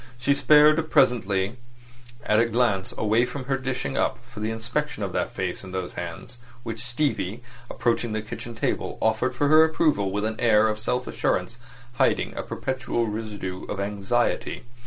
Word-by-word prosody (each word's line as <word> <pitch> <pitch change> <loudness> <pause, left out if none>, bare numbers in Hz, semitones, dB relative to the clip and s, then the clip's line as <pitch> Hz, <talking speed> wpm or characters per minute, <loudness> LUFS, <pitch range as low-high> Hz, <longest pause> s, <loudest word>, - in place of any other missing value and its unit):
She 130 +3 +2
spared 155 +2 +5
presently 100 -2 +2 0.7
a 110 +2 +4
glance 115 -5 +1
away 110 +2 +3
from 130 +2 -4
her 135 +1 0
dishing 130 0 -3
up - - +1
for 120 -3 -11
the 110 +1 -1
inspection 120 +4 -3
of 95 - -3
that - - -1
face - - -3
and 95 0 -8
those 90 -1 -3
hands 90 +8 -6 0.2
which 115 -2 -5
Stevie, 120 -4 -2 0.3
approaching 120 -1 0
the 110 0 -2
kitchen 115 +2 -7
table, 115 - -2
offered 125 +3 +1
for 145 +3 +1
her 155 +1 +8
approval 155 -10 +2
with 105 +2 -1
an 110 0 -3
air 110 -2 +5
of 110 0 -2
self 125 +3 -1
assurance 120 +1 -1 0.4
hiding - - +2
a - - -2
perpetual 125 -3 -2
residue 105 -4 -5
of 100 - -5
anxiety. 105 +4 -1
115 Hz, 165 wpm, -25 LUFS, 105-125 Hz, 0.7 s, her